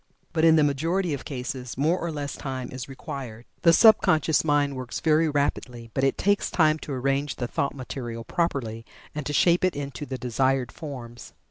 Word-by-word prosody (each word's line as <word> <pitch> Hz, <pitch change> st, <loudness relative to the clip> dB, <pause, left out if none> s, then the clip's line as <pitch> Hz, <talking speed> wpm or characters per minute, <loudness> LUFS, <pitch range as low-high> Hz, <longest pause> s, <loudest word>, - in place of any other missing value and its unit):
But 160 Hz, -2 st, +1 dB
in 165 Hz, -1 st, +7 dB
the 155 Hz, -, +5 dB
majority 165 Hz, +5 st, 0 dB
of 140 Hz, -, -5 dB
cases 125 Hz, -2 st, -5 dB
more 160 Hz, +6 st, +2 dB
or 170 Hz, -, -3 dB
less 145 Hz, -2 st, -4 dB
time 130 Hz, -2 st, -5 dB
is 130 Hz, 0 st, -7 dB
required. 125 Hz, -4 st, -7 dB, 0.2 s
The 170 Hz, -, +6 dB
sub 220 Hz, +4 st, +7 dB
conscious 160 Hz, -4 st, +2 dB
mind 145 Hz, -2 st, +1 dB
works 130 Hz, -1 st, -5 dB
very 160 Hz, 0 st, +3 dB
rapidly, 125 Hz, -5 st, -2 dB
but 135 Hz, -, -1 dB
it 135 Hz, -, +2 dB
takes 200 Hz, +1 st, +1 dB
time 155 Hz, -2 st, +3 dB
to 145 Hz, -, -6 dB
arrange 135 Hz, +2 st, -1 dB
the 125 Hz, -, -3 dB
thought 140 Hz, -, -2 dB
material 120 Hz, -3 st, -6 dB
properly, 130 Hz, -9 st, -2 dB, 0.3 s
and 150 Hz, -2 st, -4 dB
to -, -, -2 dB
shape 170 Hz, +4 st, +4 dB
it 185 Hz, -1 st, +2 dB
into 145 Hz, +1 st, -5 dB
the 130 Hz, -, -4 dB
desired 130 Hz, +1 st, 0 dB
forms. 125 Hz, -6 st, -9 dB
140 Hz, 195 wpm, -25 LUFS, 130-160 Hz, 0.3 s, in